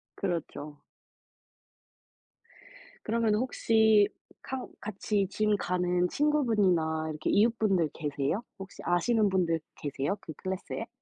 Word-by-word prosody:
그렇죠. 150 -5 -4 2.2
그러면은 220 -1 +1
혹시 220 -4 +4 0.3
카 265 -1 -5
같이 205 -1 -1
짐 210 0 +2
가는 180 -1 0
친구분이나 200 - +2
이렇게 155 0 -2
이웃분들 205 -7 +3
계세요? 145 +5 -2 0.2
혹시 195 0 -9
아시는 210 +5 +2
분들 175 -4 +1 0.2
계세요? 145 +6 -2
그 160 - -8
클래스에? 190 0 -4
195 Hz, 245 characters per minute, -29 LUFS, 165-220 Hz, 2.2 s, 혹시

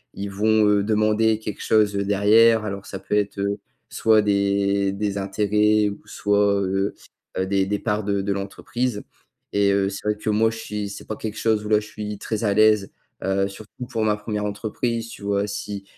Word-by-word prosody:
ils 100 +1 -4
vont, 110 +1 +3
heu, 105 -1 +4
demander 110 +1 +2
quelque 105 -2 -6
chose, 105 -2 +3
heu, 100 - 0
derrière. 110 +2 +4
Alors 100 -1 -5
ça 95 - -6
peut - - -6
être, 100 -1 0
heu, 100 +1 -1 0.3
soit 110 -1 +3
des 100 -1 +1
des 100 0 -2
intérêts 105 +2 +2
ou 100 - -8
soit, 100 -1 +2
heu, 95 +1 -1 0.4
heu, 95 - +1
des 95 0 +1
des 105 +1 0
parts 105 -1 -1
de 100 -1 0
de 100 0 0
l'entreprise. 105 +4 -3 0.5
Et 100 0 +3
heu, 100 0 +2
c'est 95 - -6
vrai 105 0 +1
que 110 - -3
moi 110 +2 +3
je 115 - -7
suis 105 -2 -4
c'est 100 - -9
pas 110 - -4
quelque 110 -1 -5
chose 110 -2 +1
où - - -4
là 105 -1 +5
je 105 - -9
suis 105 -1 -6
très 110 +2 -3
à 100 - +2
l'aise, 105 -2 +4 0.3
heu, 95 0 +1
surtout 105 +5 -9
pour 110 - -2
ma 105 -1 +2
première 105 -1 -3
entreprise, 115 +3 -3
tu - - -11
vois? 100 0 0
Si 100 0 -5
105 Hz, 205 wpm, -23 LUFS, 100-110 Hz, 0.5 s, là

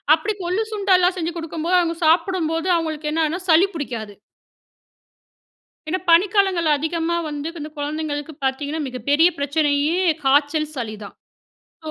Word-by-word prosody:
அப்படி 325 +7 -2
கொள்ளு, 365 +5 -1
சுண்டலாம் 375 -3 +3
செஞ்சி 340 -1 -2
கொடுக்கும் 325 -1 -5
போது, 365 +1 +3
அவங்க 335 -1 -1
சாப்பிடும்போது 330 0 +1
அவங்களுக்கு 315 -2 -3
என்னனா 320 +1 0
சளி 335 +3 +6
பிடிக்காது. 230 -9 -5 1.7
ஏன்னா 370 - 0
பனிக்காலங்கள்ல 370 -2 +3
அதிகமா 325 +2 -1
வந்து 295 +1 -4
இந்த 300 - -5
குழந்தைங்களுக்கு 295 0 -4
பார்த்தீங்கன்னா 285 +4 -2
மிகப்பெரிய 285 +7 +2
பிரச்சனையே 290 +3 +1 0.2
காய்ச்சல், 290 +3 +2
சளி 225 -4 -4
தான். 200 - -11 0.7
ஓ! - - -3
315 Hz, 125 wpm, -21 LUFS, 290-345 Hz, 1.7 s, சளி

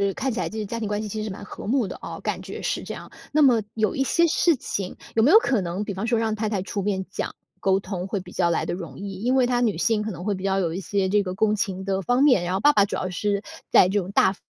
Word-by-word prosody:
看 265 0 -1
起 235 - -3
来 - - -1
这 220 - -7
个 215 - -2
家 230 +3 -4
庭 220 - -2
关 205 0 -1
系 215 - -4
其 215 +1 -4
实 215 - -4
蛮 200 +1 -8
和 - - -8
睦 245 -1 +2
的 - - -6
哦， - - -7
感 - - -2
觉 - - -7
是 - - -2
这 - - -6
样。 - - -10 0.2
那 305 +1 +4
么 245 -5 +5
有 220 -1 +1
一 270 - +1
些 340 +5 +3
事 335 0 +3
情， 195 -6 -4 0.2
有 225 - +3
没 245 - +5
有 400 - +9
可 270 - +2
能， 180 +3 -3
比 205 - -4
方 195 +4 -3
说 235 0 +2
让 225 -1 0
太 215 0 -2
太 205 -2 -1
出 200 +1 -3
面 190 -1 -1
讲 - - -4 0.2
沟 190 0 +2
通 190 -2 -5
会 200 - -2
比 180 -1 -11
较 175 -2 +1
来 170 - 0
得 - - -2
容 165 -7 -7
易， 195 -1 -6
因 250 +3 +2
为 260 -2 +4
她 245 0 +1
女 220 -8 +1
性， 215 +4 +2
可 215 - -3
能 180 -3 -7
会 210 - +1
比 185 -1 -6
较 195 0 +1
有 170 -4 0
一 180 - -3
些 195 0 0
这 205 +2 +3
个 185 -2 -4
共 215 +2 +2
情 190 -2 -2
的 195 0 0
方 245 +7 +2
面， 255 -11 +5
然 175 - -2
后 - - 0
爸 295 +7 +5
爸 205 - +5
主 195 - -2
要 185 - -3
是 200 +2 -1 0.3
在 - - +6
这 200 +2 +1
种 190 0 -5
大 190 -1 +4
方 - - -22
205 Hz, 340 characters per minute, -24 LUFS, 190-230 Hz, 0.3 s, 有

